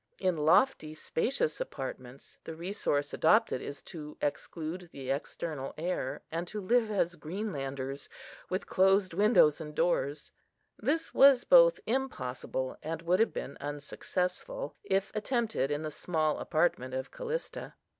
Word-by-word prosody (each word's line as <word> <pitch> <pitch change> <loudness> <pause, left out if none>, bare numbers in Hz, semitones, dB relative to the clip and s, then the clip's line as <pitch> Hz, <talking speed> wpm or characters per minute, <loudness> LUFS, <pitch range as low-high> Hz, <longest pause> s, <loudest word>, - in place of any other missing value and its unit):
In 185 -2 +1
lofty 155 - +3
spacious 160 - -1
apartments 130 -1 -7
the 160 - -7
resource 170 -4 -1
adopted 210 - +3
is 140 - -7
to 150 -3 -9
exclude 165 +4 -4
the 135 -1 -4
external 140 0 -4
air, 160 -5 -2
and 170 +2 -3
to 210 - -5
live 225 +3 +2
as 185 -4 +1
Greenlanders, 140 -6 -4 0.4
with 185 +1 -2
closed 190 -1 +3
windows 185 -6 +5
and 150 -1 -7
doors; 155 -3 0 0.5
this 325 +3 -1
was 270 -2 +7
both - - +7
impossible, 130 - -2
and 165 +1 -4
would 180 +3 +2
have 225 - +3
been 140 - -6
unsuccessful, 180 - -3
if 195 - 0
attempted 220 - 0
in 145 +1 -1
the 155 - -3
small 155 -2 0
apartment 140 -6 0
of 130 - -4
Callista. - - -5
170 Hz, 135 wpm, -31 LUFS, 145-210 Hz, 0.5 s, was